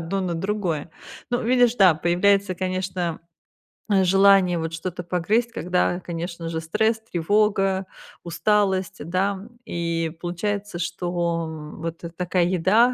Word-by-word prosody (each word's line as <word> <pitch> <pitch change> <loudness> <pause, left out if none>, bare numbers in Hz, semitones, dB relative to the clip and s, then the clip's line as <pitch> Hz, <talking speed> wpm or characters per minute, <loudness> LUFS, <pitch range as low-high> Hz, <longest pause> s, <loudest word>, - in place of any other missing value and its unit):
одно 170 +4 -2
на 180 -2 -2
другое. 175 -4 -2 0.4
Ну, 245 0 0
видишь, 245 0 +4
да, 190 -6 +6
появляется, 185 +4 +2
конечно, 185 -2 -2 0.7
м, 195 -2 +4
желание 195 -1 +5
вот 165 0 -4
что-то 175 +2 -5
погрызть, 205 +8 0
когда, 180 -3 0
конечно 170 -1 -5
же, 160 -1 -3
стресс, 220 +7 0
тревога, 195 +2 +2 0.4
усталость, 190 +1 +1
да. 190 +2 0 0.3
И 170 -4 -2
получается, 200 +2 -3
что, 170 -1 -1
м, 155 0 -9
вот 165 0 -5
такая 180 0 +1
еда, 190 +8 +3
180 Hz, 125 wpm, -23 LUFS, 170-200 Hz, 0.7 s, да